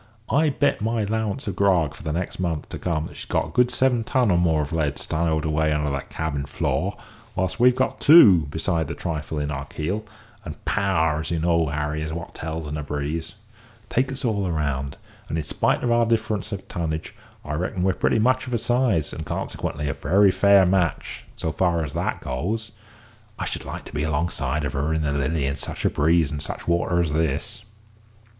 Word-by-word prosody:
I'll 155 +3 +4
bet 140 -2 +1
my 110 0 0
'lowance 110 +4 -2
of 100 -4 -3
grog 90 -7 +3
for - - -13
the 80 - -3
next 85 +3 -3
month 85 -5 -2
to - - -6
come 80 -3 -1
that - - -9
she's - - -8
got 80 - -1
good 125 0 +4
seven 125 -1 +2
ton 125 -2 +2
or 90 - +3
more 80 -3 +2
of 75 - -6
lead 75 -3 0
stowed 80 -1 -1
away 80 0 +1
under 75 -1 0
her 70 0 -1
cabin 70 -3 -3
floor; - - -1 0.4
whilst 95 +3 -1
we've 125 +1 +6
got 130 +1 0
two, 100 - +8
besides 80 +1 -1
the - - -4
trifle 80 -2 -4
in 75 0 -1
our 70 -2 -4
keel; 90 +10 -3 0.4
and - - -9
power, 80 -7 +1
as 80 - -4
you 85 - 0
know 85 +1 +2
well, 80 -1 +2
Harry, 75 +1 -2
is 80 0 -3
what 85 0 -6
tells 80 0 -5
in 75 +1 -4
a - - -3
breeze. 75 +4 -4 0.6
Take 130 +2 +1
us 135 0 -4
all 100 -5 0
round, 70 -4 -2 0.3
and, 80 - -1
in 80 - -1
spite - - 0
of 120 - +1
our 120 -1 +3
difference 110 -1 0
of 100 -2 -5
tonnage, 80 -4 -3 0.3
I 75 - -4
reckon 90 +3 -2
we're 95 0 +3
pretty - - +1
much 130 +3 +2
of 125 - -1
a - - +3
size, 115 - +1
and - - -5
consequently 75 0 -3
a 70 - 0
very 100 +1 +4
fair 100 0 +5
match, 90 -4 0
so 80 - -2
far 85 -2 +1
as 75 - -7
that - - -2
goes. 100 - -3 0.7
I - - -3
should - - -4
like - - -6
to - - -11
be 75 - -1
alongside 75 -2 -1
of 70 - -3
her 75 +3 0
in 80 - 0
the 75 - 0
Lily 70 +1 0
in 70 +1 -1
such - - -5
a - - +3
breeze 80 0 +3
and 75 -1 -4
such 70 - -5
water 85 0 +2
as 80 -3 -1
this." 80 - -1
85 Hz, 215 wpm, -24 LUFS, 75-105 Hz, 0.7 s, two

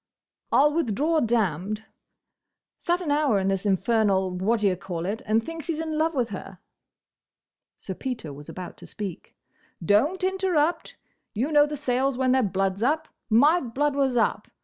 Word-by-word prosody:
"I'll 295 +2 +4
withdraw 310 +2 +1
'damned.' 215 - 0 1.0
Sat 350 +1 0
an 315 -5 -2
hour 290 -7 +2
in 190 0 0
this 195 +1 -1
infernal 195 -1 +2
what 210 +5 0
d' - - -4
ye 195 -2 +3
call 175 -2 -5
it, 205 +4 -3
and 220 +1 +2
thinks 330 -2 -7
he 335 - -1
's - - -6
in 320 -1 -3
love 320 0 +1
with 245 -3 0
her." 195 -1 -8 1.2
Sir 190 - -6
Peter 225 - -5
was 145 +1 -11
about 180 -1 -8
to - - -12
speak. 200 -5 -7 0.5
"Don't 290 - +2
interrupt!—You 345 - -2
know 295 -1 +5
the 295 0 -5
Sayles 260 -1 0
when 260 -1 +2
their 260 0 +4
blood 195 -2 0
's - - -9
up. 310 +6 +1 0.2
My 290 +10 +5
blood 275 +4 -1
was 270 -3 +1
up. 225 - +1
240 Hz, 170 wpm, -25 LUFS, 195-295 Hz, 1.2 s, know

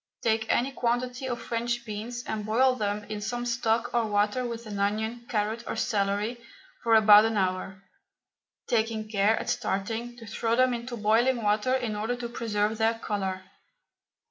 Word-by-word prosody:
Take 220 -1 +1
any 260 +3 +1
quantity 250 +1 -1
of 240 -1 -3
French 235 +1 -2
beans 225 +3 -5
and 215 -1 -3
boil 250 +5 +3
them 210 -3 -2
in 210 0 -6
some 240 +3 -3
stock 235 -1 0
or 240 -1 +3
water 210 +4 +1
with 235 -1 -5
an 205 -2 -5
onion, 220 +4 -1
carrot, 220 +1 -1
or - - -3
celery 210 +2 -1 0.4
for 230 -1 +4
about 210 -1 +8
an 225 -1 0
hour, 190 0 -2 0.8
taking 220 -2 0
care, 210 +1 +2
at - - -4
starting, 230 +5 -2
to 230 - -10
throw 225 +1 -1
them 255 0 +3
into 240 +1 -5
boiling 230 +3 +2
water 210 +5 +2
in 240 -5 -2
order 220 +4 -1
to 240 -1 -5
preserve 220 -2 -1
their 225 +1 +2
colour. 190 -4 -3
225 Hz, 170 wpm, -27 LUFS, 210-240 Hz, 0.8 s, about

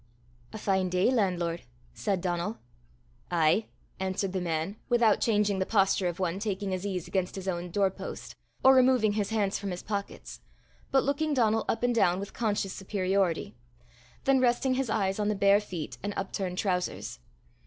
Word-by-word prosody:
"A - - -6
fine 190 -3 +1
day, 185 +6 +2
landlord!" 180 -7 0 0.3
said 195 -4 -1
Donal. 180 +4 -2 0.7
"Ay," 170 +5 +2 0.3
answered 190 0 -2
the 190 - -1
man, 170 +3 -2
without 235 -3 +4
changing 210 -3 +2
the 190 - +1
posture 195 -3 +2
of 175 -1 -3
one 185 0 -1
taking 200 -2 -2
his 185 +2 -2
ease 185 -4 -3
against 185 -2 -1
his 190 -1 -6
own 175 -1 -2
door 195 +2 +2
post, - - -8 0.3
or 265 - +8
removing 255 -5 +4
his 205 -1 -1
hands 205 -3 0
from 200 - -4
his 180 -1 -5
pockets, 200 -1 -5 0.5
but 270 - +3
looking 290 +2 0
Donal 225 -3 +2
up 225 - -1
and 245 0 +3
down 180 -5 +3
with 200 0 -6
conscious 205 -4 -1
superiority, 190 - -1 0.7
then 270 -1 +4
resting 255 +1 +2
his 260 -2 -1
eyes 195 -2 0
on 210 - +1
the 210 - +1
bare 200 +1 +4
feet 175 -7 -6
and 205 +1 -4
upturned 190 -1 -3
trousers. 180 -3 -2
195 Hz, 175 wpm, -29 LUFS, 185-220 Hz, 0.7 s, or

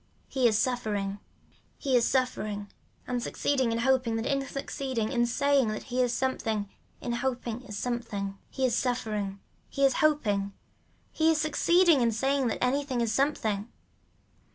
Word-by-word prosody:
He 260 -3 +2
is 215 -2 +3
suffering, 210 -6 -1 0.6
he 270 -3 0
is 240 - +4
suffering 215 -6 -1 0.3
and 250 -1 -2
succeeding 260 -1 0
in 230 - 0
hoping 250 -1 +2
that 225 +1 -2
in 275 0 +1
succeeding 265 -5 -3
in 240 -2 +2
saying 275 +1 +2
that 215 0 -3
he 255 0 -1
is 245 -1 +2
succeeding 225 -5 -1 0.3
in 240 - -3
hoping 245 -1 -2
is 210 -5 -8
something. 205 -5 -3
He 265 - -1
is 240 -3 +2
suffering, 215 -6 -1 0.3
he 275 - +2
is 270 - +4
hoping, 205 -10 +2 0.6
he 320 0 +2
is 320 -1 +3
succeeding 325 +1 +4
in 235 -1 +3
saying 270 +3 +1
that 225 - -2
anything 265 0 0
is 230 -2 +1
something. 225 -6 0
245 Hz, 155 wpm, -28 LUFS, 220-270 Hz, 0.6 s, is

